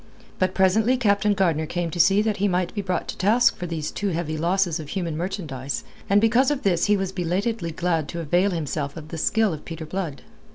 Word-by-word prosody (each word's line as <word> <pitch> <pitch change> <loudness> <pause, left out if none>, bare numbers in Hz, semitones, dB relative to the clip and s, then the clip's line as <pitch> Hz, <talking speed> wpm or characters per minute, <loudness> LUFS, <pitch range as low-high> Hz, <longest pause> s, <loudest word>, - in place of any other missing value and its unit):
But 185 0 +1
presently 215 +7 +3
Captain 205 -3 +2
Gardner 165 -5 +1
came 175 -1 -2
to 175 - -5
see 195 +4 +5
that 215 -2 0
he 205 +1 +1
might 180 -2 0
be 205 - -2
brought 185 -2 -2
to - - -5
task 230 +5 +4
for 180 - -5
these 160 -3 -3
too 205 - -3
heavy 165 -3 -2
losses 175 +1 +1
of 150 -2 -8
human 170 -4 -3
merchandise 155 -7 -4 0.3
and 200 +1 +5
because 235 +5 +4
of 290 -2 -2
this 175 -4 +2
he 210 0 +3
was 190 -1 -2
belatedly 185 +2 -1
glad 165 -2 -1
to 170 - -5
avail 175 +5 +2
himself 150 -4 -3
of 155 -1 -9
the 165 - -5
skill 220 +2 +2
of 155 - -7
Peter 165 -1 -7
Blood. 165 -4 -4
180 Hz, 220 wpm, -24 LUFS, 165-200 Hz, 0.3 s, see